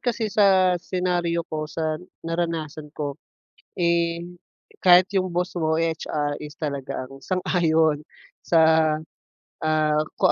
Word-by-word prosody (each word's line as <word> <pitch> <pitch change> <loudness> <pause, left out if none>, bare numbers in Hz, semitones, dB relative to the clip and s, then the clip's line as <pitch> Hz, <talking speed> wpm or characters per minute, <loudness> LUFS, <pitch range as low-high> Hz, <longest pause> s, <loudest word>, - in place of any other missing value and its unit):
kasi 230 -3 -1
sa 185 -3 +4
senaryo 175 -2 -1
ko, 155 -1 -3
sa 155 -1 -2 0.2
naranasan 165 -3 -3
ko, 145 0 -4 0.6
eh, 170 0 +1 0.6
kahit 180 +1 +7
'yong 185 -2 -1
boss 180 +1 -1
mo, 160 -1 +1
eh, 165 -1 0
HR 145 -2 -2
is 150 0 -8
talaga 140 -3 -4
ang 135 - -11
sang-ayon 160 -4 +1 0.4
sa, 165 - +4 1.0
ah, 155 -1 +2 0.2
kung - - +5
165 Hz, 120 wpm, -24 LUFS, 155-180 Hz, 1.0 s, kahit